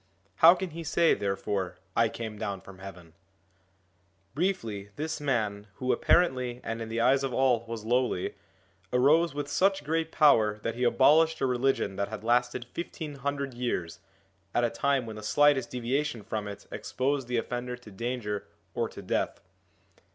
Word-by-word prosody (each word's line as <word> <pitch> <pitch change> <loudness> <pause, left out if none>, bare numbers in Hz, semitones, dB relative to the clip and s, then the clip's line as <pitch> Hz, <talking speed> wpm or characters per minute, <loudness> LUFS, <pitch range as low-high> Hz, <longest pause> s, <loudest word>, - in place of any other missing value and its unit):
How 170 +3 +8
can 185 -1 -4
he 165 +2 -6
say 165 +1 +3
therefore, 100 -1 -2 0.2
I 115 -1 +4
came 110 -2 -6
down 100 -4 -3
from 95 -1 -13
heaven? 90 -4 -11 0.6
' 95 +2 -41
Briefly, 120 - -2
this 155 +3 -3
man, 105 -7 -1
who 130 0 -1
apparently, 125 -8 +2
and 115 0 -4
in 110 - -5
the 115 +1 -2
eyes 135 +3 +4
of 130 -3 -2
all, 130 -3 +3
was 115 -2 -6
lowly, 120 -5 0 0.6
arose 145 +6 +4
with 145 -1 -3
such 190 +4 +2
great 160 +2 -1
power 110 -9 +4
that 115 - -1
he 125 +2 -3
abolished 155 +6 +4
a - - +1
religion 125 -5 0
that 100 0 0
had 110 0 -7
lasted 120 +1 +1
fifteen 155 +2 -6
hundred 140 -1 -3
years, 120 -9 -3 0.6
at 120 - +3
a 120 - +1
time 140 -3 +1
when 110 -1 -7
the - - -7
slightest 135 +3 +3
deviation 125 0 -2
from 105 0 -4
it 100 -1 -8
exposed 135 0 -2
the 125 -1 -1
offender 125 +1 -3
to 120 -3 -14
danger 105 -1 -3 0.3
or - - -1
to - - -10
death. - - -1
125 Hz, 170 wpm, -28 LUFS, 105-140 Hz, 0.6 s, How